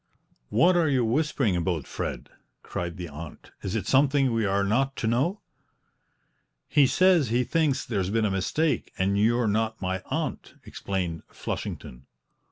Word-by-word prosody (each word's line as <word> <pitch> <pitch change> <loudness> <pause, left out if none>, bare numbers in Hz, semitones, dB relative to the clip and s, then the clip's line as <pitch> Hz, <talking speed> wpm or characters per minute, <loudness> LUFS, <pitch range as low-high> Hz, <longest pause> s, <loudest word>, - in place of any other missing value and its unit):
"What 180 +2 +4
are 165 -3 +3
you 130 -4 +2
whispering 130 - +1
about, 85 -4 -1
Fred?" - - -5 0.3
cried 85 -1 -5
the 90 -1 -5
aunt. 75 +1 -10
"Is 95 +2 -3
it 105 -4 -2
something 135 -1 +3
we 115 -2 +1
are 100 +1 +1
not 135 +7 +1
to - - -4
know?" 135 - +1 1.3
"He 145 -3 +4
says 180 - +4
he 120 +2 +2
thinks 150 0 0
there's 95 -5 -1
been 110 +1 +1
a 105 - +1
mistake, 145 - 0
and 95 +1 +1
you're 120 +2 +3
not 110 +1 0
my 95 0 -2
aunt," - - -4
explained 90 -5 -4
Flushington. 60 +3 -6
110 Hz, 155 wpm, -26 LUFS, 95-135 Hz, 1.3 s, What